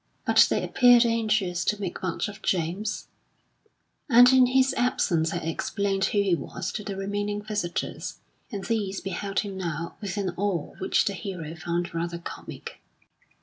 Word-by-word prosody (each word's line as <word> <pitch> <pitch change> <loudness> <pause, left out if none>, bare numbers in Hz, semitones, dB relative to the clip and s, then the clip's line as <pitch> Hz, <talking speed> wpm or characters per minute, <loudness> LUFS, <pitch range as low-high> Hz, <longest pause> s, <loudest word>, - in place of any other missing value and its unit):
But - - +6
they - - 0
appeared 245 -1 +6
anxious 215 -6 +1
to 210 - 0
make 190 -4 -4
much 185 +3 -2
of 205 -1 -9
James, 185 +4 -1 1.0
and 245 +1 +8
in 255 -1 +6
his 265 +1 +3
absence 205 -11 +1
had 170 +2 -3
explained 195 +4 -1
who 205 -1 +2
he 195 -3 +2
was 180 +2 -3
to 210 - -5
the 200 -1 -5
remaining 205 +1 -2
visitors, 210 -5 -3 0.3
and 200 -3 -4
these 205 -4 -1
beheld 195 +1 -2
him 200 -2 -6
now 170 -2 -4
with 200 -1 -4
an 195 -3 -1
awe 190 -5 -1
which 190 - +2
the 200 - 0
hero 180 -5 -6
found 170 +1 -3
rather 170 +1 -2
comic. 170 - -9
195 Hz, 160 wpm, -26 LUFS, 175-210 Hz, 1.0 s, and